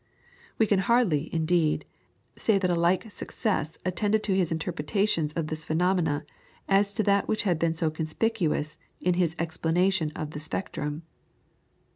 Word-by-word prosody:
We 220 - +4
can 205 -3 +2
hardly, 190 -8 +2
indeed, 160 -2 +1 0.5
say 220 -3 +2
that 185 -2 +1
a - - +2
like 180 +5 +1
success 185 -7 -2
attended 205 +4 +1
his 190 -4 +1
interpretation 165 +1 0
of 165 - -1
these 155 +1 -4
phenomena 160 -3 +1 0.5
to 200 +2 +3
that 200 -1 +2
which 215 - 0
had 175 -6 +1
been 165 0 +1
so 160 -1 0
conspicuous 160 -1 -1 0.2
in 180 - +2
his 175 -2 +1
explanation 170 +1 +1
of 155 -1 -4
the 150 - -6
spectrum. 155 -1 -4
170 Hz, 140 wpm, -27 LUFS, 155-195 Hz, 0.5 s, We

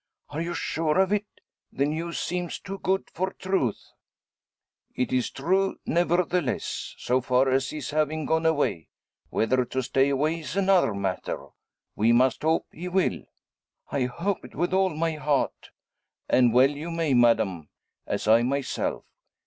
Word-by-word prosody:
"Are 150 +3 -4
you 170 +1 -3
sure 160 +2 0
of 190 +1 +3
it? 210 0 0 0.4
The 140 - 0
news 165 +3 -3
seems 175 0 -3
too 195 0 -7
good 190 +1 0
for 185 +2 -1
truth." 185 - -1 1.1
"It's 125 0 0
true, 190 +7 0
nevertheless; 175 -4 0
so 125 +1 +1
far 130 +2 +2
as 135 +1 +1
his 150 -4 -5
having 155 0 0
gone 160 +1 +2
away. 145 - 0 0.4
Whether 125 +3 +1
to 130 +2 -2
stay 135 +2 +2
away 150 +4 0
is 155 +1 -6
another 190 - +3
matter. 95 -2 -3 0.5
We 115 +2 +3
must 125 +1 +3
hope 160 +1 +1
he 175 +3 -7
will." 185 +1 0 0.7
"I 135 -3 +1
hope 170 +10 -2
it - - -12
with 175 +1 -1
all 190 0 +3
my 165 0 -1
heart." 145 -1 -1 0.6
"And 125 -2 +4
well 130 +4 +5
you 150 +4 -6
may, 165 -4 0
madame; 110 -9 +3 0.4
as - - -2
I 115 +2 +6
myself. 135 +3 -2
150 Hz, 150 wpm, -26 LUFS, 130-175 Hz, 1.1 s, I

